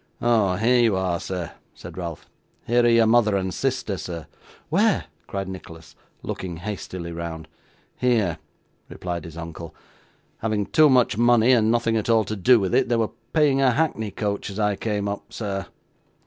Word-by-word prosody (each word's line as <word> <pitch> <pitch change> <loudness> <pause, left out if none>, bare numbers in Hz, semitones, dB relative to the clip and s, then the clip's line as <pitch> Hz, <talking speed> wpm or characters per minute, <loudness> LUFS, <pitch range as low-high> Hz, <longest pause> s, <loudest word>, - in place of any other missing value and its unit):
'Oh! 110 -6 +2
here 120 +5 +3
you 115 -4 +3
are, 90 -2 -1
sir!' 90 -4 -5 0.2
said - - -10
Ralph. 85 -3 -6 0.4
'Here 120 +1 +3
are - - +4
your 115 -1 +5
mother 110 -2 +4
and 95 -1 -2
sister, 125 -7 -2
sir.' 85 -3 -6 0.4
'Where?' - - +2 0.2
cried 95 -1 -4
Nicholas, 85 -4 -10 0.3
looking 90 -3 -5
hastily 90 -2 -6
round. 85 -2 -6 0.5
'Here!' 110 -10 +1 0.5
replied 85 -3 -5
his 85 -1 -10
uncle. 85 -1 -8 0.6
'Having 110 -2 -1
too 155 -2 +6
much 125 -4 +3
money 120 0 +5
and 110 -3 +4
nothing 115 -1 +2
at 110 - -2
all 115 -1 +4
to 110 - -4
do 115 +5 +5
with 95 -3 -1
it, - - +3
they 120 - +2
were 115 -2 0 0.2
paying 145 -4 +3
a 135 - +5
hackney 120 -7 0
coach 100 +1 -3
as 100 - -7
I 105 -1 +1
came 105 -1 -2
up, 100 0 -5
sir. 95 -4 -4
105 Hz, 175 wpm, -24 LUFS, 90-115 Hz, 0.6 s, too